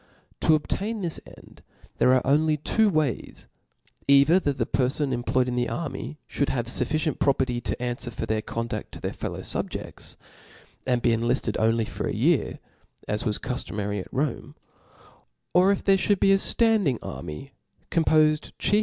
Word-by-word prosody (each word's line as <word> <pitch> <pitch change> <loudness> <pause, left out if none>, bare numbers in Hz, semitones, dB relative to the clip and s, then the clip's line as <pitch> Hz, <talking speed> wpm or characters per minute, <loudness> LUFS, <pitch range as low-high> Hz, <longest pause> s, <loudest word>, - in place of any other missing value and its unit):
To 155 - +4
ob^ 150 - -10
tain 215 +2 -2
this 170 -3 -3
end, - - -16 0.4
there 125 - +5
are 130 - +1
only 150 +3 +3
two 215 +8 +2
ways, 155 - -2 0.6
either 140 +6 +6
that 145 -6 -1
the - - 0
perfons 135 +1 0
employed 125 +1 +1
in 125 - -2
the 125 0 0
army, 155 -1 -5
fliould 140 - -1
have 120 -3 -1
fuf 120 - 0
ficient 155 -1 -1
property 130 -3 +1
to - - -2
anfwer 120 0 -3
for - - -4
their 110 0 -1
conduft 115 +1 -4
to - - -8
their - - -4
fellow - - -5
fubjeifts, - - -5 0.7
and 125 -2 +1
be 120 - +4
enlift:ed 115 -1 0
only 115 0 +2
for - - -4
a - - -2
year, - - +2 0.5
as 105 +2 -2
was 105 -3 0
cuftomary 105 -4 -3
at 90 - -8
Rome: 140 -1 -2 1.0
or 185 +2 +5
if 200 - -1
there 195 -1 +4
fliould 200 0 +1
be 195 - +4
a 195 - +6
ftanding 205 - +2
army 130 - -7 0.4
compofed 155 -2 +3
chiefl. 205 - +2
140 Hz, 170 wpm, -25 LUFS, 120-160 Hz, 1.0 s, either